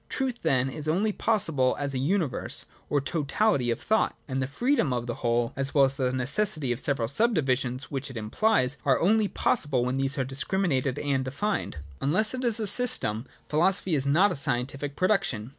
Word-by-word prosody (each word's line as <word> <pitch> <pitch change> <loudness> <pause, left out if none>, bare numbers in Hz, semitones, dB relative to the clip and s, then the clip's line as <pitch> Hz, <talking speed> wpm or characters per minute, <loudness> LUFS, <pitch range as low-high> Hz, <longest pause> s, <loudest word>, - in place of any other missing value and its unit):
Truth, 260 -3 -2
then, 135 -5 +1
is 145 +3 -5
only 195 +7 +1
possible 165 - +1
as 140 -1 -3
a 130 - -2
universe 155 - -1 0.2
or 145 - +2
totality 145 - 0
of 115 - -1
thought; 220 +1 +1
and 135 -1 -2
the 130 - -1
freedom 240 - 0
of 120 -1 -2
the 120 - -3
whole, 120 0 0
as 135 +1 -2
well 140 - +6
as 135 - -1
the 130 -2 -1
necessity 140 +3 0
of 120 - -2
the - - +2
several 135 -5 0
sub 225 - +2
divisions, 130 -3 -1
which 140 0 -3
it 130 - -8
implies, 130 - +1
are 135 -3 +2
only 215 +4 +3
possible 145 - 0
when 125 +1 -1
these 135 +1 -1
are 130 - 0
discrimi 140 +3 0
nated 130 -1 -3
and 135 -2 0
defined. 140 - -3 0.2
Unless 185 - +1
it 255 0 -4
is 235 -2 +2
a 220 - -1
system, 185 - +2 0.2
a - - -37
philosophy 180 +3 +1
is 140 -2 +1
not 175 +9 +4
a - - -2
scientific 135 +1 -2
production. 175 - 0
140 Hz, 205 wpm, -27 LUFS, 130-195 Hz, 0.2 s, well